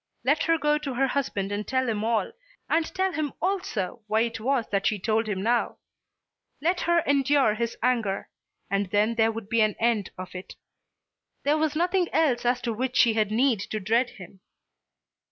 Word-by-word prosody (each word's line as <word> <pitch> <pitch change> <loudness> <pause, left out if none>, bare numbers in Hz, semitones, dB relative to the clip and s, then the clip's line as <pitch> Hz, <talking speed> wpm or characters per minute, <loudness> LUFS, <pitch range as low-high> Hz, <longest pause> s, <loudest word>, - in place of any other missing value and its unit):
Let - - +2
her 330 -1 +3
go 300 -1 +1
to 275 -4 -5
her 270 +2 +2
husband 205 -8 -2
and 205 +1 -3
tell 260 -1 0
him 215 -2 -1
all, 230 - 0 0.4
and 325 0 +1
tell 380 0 +1
him 310 -4 -3
also 365 - -2
why 215 +1 +2
it 230 -1 -2
was 250 0 0
that 195 -1 +1
she 215 - +1
told 220 +3 0
him 190 -2 -2
now. 235 +2 +1 0.8
Let 350 +4 0
her 340 0 +3
endure 280 -4 +3
his 235 +1 -3
anger, 230 -6 0 0.4
and 200 0 0
then 210 +3 +2
there 225 -1 +2
would 225 -2 -7
be 230 +1 +2
an 215 -1 +2
end 225 -4 +1
of 185 0 -8
it. 185 0 -8 0.9
There 300 +2 +2
was 310 -1 0
nothing 355 +2 +1
else 260 -7 +2
as 245 0 +1
to 230 - -1
which 255 +3 -2
she 230 - +5
had 215 -2 +1
need 235 +1 +2
to 215 +2 -4
dread 230 +5 +1
him. 190 -4 -13
235 Hz, 190 wpm, -26 LUFS, 215-285 Hz, 0.9 s, she